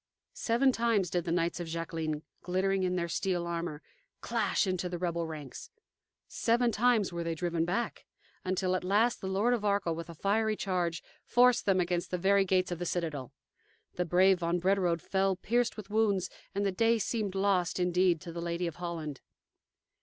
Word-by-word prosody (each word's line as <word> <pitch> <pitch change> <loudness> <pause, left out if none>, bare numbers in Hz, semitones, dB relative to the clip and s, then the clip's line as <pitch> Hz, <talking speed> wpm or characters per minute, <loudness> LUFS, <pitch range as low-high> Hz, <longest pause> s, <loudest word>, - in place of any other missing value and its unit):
Seven 245 +4 +2
times 225 -7 +1
did 175 -2 -1
the 165 - -2
knights 170 0 0
of 175 - -4
Jacqueline, 160 -2 -3 0.2
glittering 190 +2 0
in 180 -1 0
their 170 -1 -1
steel 175 0 -1
armor, 170 -3 -4 0.4
clash - - 0
into 185 -1 -1
the 175 - -4
rebel 170 -1 -2
ranks; 150 -5 -8 0.6
seven 235 +1 +1
times 225 -4 +2
were 170 0 -3
they 165 -1 -2
driven 170 0 -1
back, 195 +8 -3 0.4
until, 185 0 0
at 185 - -2
last, 210 +6 +2
the 190 - -4
Lord 200 +6 +2
of 235 -4 -1
Arkell, 200 -4 +1
with 165 +1 -6
a 170 - -8
fiery 215 +5 +1
charge, 175 -5 -1 0.2
forced 250 -2 +4
them 190 -2 +4
against 175 0 -1
the 180 - -1
very 195 +2 +3
gates 185 -1 +1
of 175 - -3
the 175 - -3
citadel. 155 -8 -3 0.6
The 180 - -1
brave 185 +2 +4
von 170 0 0
Brederode 180 -2 +1
fell 195 0 +1
pierced 235 +5 0
with 210 -1 -9
wounds, 210 -4 +1 0.2
and 200 0 0
the 195 - +2
day 230 +4 +3
seemed 210 -2 -2
lost, 190 -3 +1
indeed, 180 -1 +2
to 170 - -7
the 170 0 -5
Lady 170 +1 -2
of 170 -3 -4
Holland. 165 -5 -5
180 Hz, 185 wpm, -30 LUFS, 170-200 Hz, 0.6 s, forced